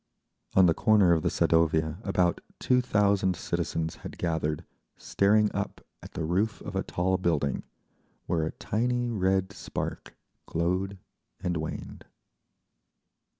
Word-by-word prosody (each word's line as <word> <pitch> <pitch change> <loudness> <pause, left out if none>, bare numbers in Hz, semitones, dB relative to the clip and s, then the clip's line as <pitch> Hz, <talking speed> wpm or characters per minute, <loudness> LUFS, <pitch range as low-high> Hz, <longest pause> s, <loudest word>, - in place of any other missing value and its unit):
On 95 - +7
the 85 - +5
corner 100 -2 +4
of 80 - +2
the - - +1
Sadovaya 80 +2 +2
about 90 -3 +1 0.2
two 125 -1 +3
thousand 100 -5 +2
citizens 80 0 -2
had - - -9
gathered, 80 -3 -1 0.3
staring 105 +1 +2
up 100 0 -3 0.2
at - - -12
the - - -3
roof 95 +6 0
of 100 - -7
a 95 - +1
tall 95 +1 0
building, 75 -7 0 0.6
where 85 - 0
a 80 - -2
tiny 120 +2 -1
red 95 -1 +1
spark - - -5 0.3
glowed 90 +4 -1 0.4
and 90 -1 -2
waned. 80 0 -6
95 Hz, 130 wpm, -28 LUFS, 80-100 Hz, 0.6 s, On